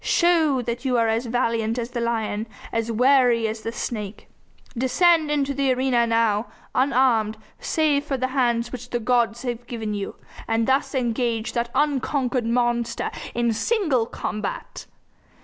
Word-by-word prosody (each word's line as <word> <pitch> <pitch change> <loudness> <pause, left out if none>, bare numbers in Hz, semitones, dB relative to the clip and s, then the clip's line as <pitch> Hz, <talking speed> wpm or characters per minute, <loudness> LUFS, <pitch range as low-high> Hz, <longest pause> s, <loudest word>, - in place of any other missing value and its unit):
Show 320 -7 +3
that 235 +1 -4
you 255 -2 +1
are 230 -1 +3
as 225 +2 0
valiant 230 -1 0
as 240 0 -3
the 240 -1 -3
lion, 225 -2 -1 0.3
as 230 0 -1
wary 245 -1 +4
as 220 0 -4
the 225 - -4
snake. 215 -3 -5 0.5
Descend 310 +6 +3
into 285 -2 0
the 275 -1 +1
arena 250 -2 +2
now, 230 -1 +2 0.3
unarmed 250 -5 +2 0.2
save 300 -3 +1
for 275 -2 -2
the 255 0 -1
hands 240 -3 +1
which 250 -1 -7
the 240 - -1
gods 235 0 +1
have 240 -1 -4
given 220 -3 -4
you, 200 -1 -4 0.3
and 225 0 +1
thus 270 +2 +1
engage 235 -2 -1
that 235 -1 -1
unconquered 265 -3 0
monster 240 0 0 0.2
in 235 -1 +1
single 275 - +1
combat! 210 -2 -5
240 Hz, 150 wpm, -23 LUFS, 230-265 Hz, 0.5 s, wary